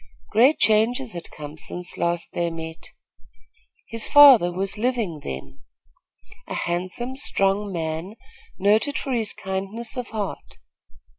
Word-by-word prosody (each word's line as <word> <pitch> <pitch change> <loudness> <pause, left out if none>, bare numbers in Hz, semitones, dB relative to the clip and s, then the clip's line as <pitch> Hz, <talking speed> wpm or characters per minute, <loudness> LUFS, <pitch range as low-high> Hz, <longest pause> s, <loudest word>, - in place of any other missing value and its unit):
Great 250 +8 +5
changes 225 +3 +2
had 170 -1 -7
come 150 +1 -10
since 180 +4 -5
last 170 0 -1
they 170 0 0
met. 160 0 -8 1.0
His 230 -1 0
father 265 -11 +8
was 190 +2 -3
living 225 -8 -1
then, 70 +1 -7 0.9
a - - -5
handsome, 185 +9 -3
strong 200 -6 +1
man, 165 +3 -4 0.4
noted 215 +8 +2
for 270 - -3
his 225 -4 0
kindness 195 +5 -4
of 250 -2 -4
heart. 210 -3 -6
195 Hz, 125 wpm, -23 LUFS, 170-230 Hz, 1.0 s, father